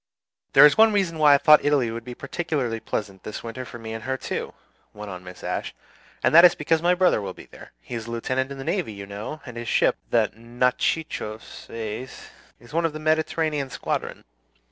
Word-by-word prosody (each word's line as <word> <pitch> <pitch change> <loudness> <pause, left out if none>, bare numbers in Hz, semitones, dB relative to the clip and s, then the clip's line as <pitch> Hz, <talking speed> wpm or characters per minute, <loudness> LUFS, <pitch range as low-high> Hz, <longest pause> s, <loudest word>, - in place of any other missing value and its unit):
"There 135 - +9
is 150 +8 +5
one 220 0 +7
reason 180 -6 0
why 150 -2 +7
I - - +5
thought 150 +2 +6
Italy 140 -6 +2
would 115 0 -6
be 125 +1 -8
particularly 140 -6 -3
pleasant 100 -3 -4
this 105 - -7
winter 115 +2 -6
for 120 - -9
me 110 -1 -7
and 110 -1 -6
for 130 - -7
her 130 - 0
too," - - -5 0.4
went 105 -1 -7
on 90 -1 -8
Mrs. 90 0 -11
Ashe; - - -3 0.5
"and - - +3
that 170 +2 +9
is, 180 - +7
because 160 +1 +1
my 175 +1 +3
brother 180 - +3
will 95 -2 -6
be - - -12
there. - - -14
He - - -10
is 115 -1 -5
a - - -7
lieutenant 130 +3 -2
in 140 - -6
the 135 - -6
navy, 110 -4 -2
you 100 -1 -8
know, 105 +10 -7
and 125 -3 -9
his 120 0 -6
ship, - - +2
the - - +2
'Natchitoches,' 120 0 -2 0.9
is 120 +4 -16
one 165 +1 +1
of 155 - -8
the 155 - -6
Mediterranean 155 -2 0
squadron. - - -4
130 Hz, 215 wpm, -24 LUFS, 115-155 Hz, 0.9 s, There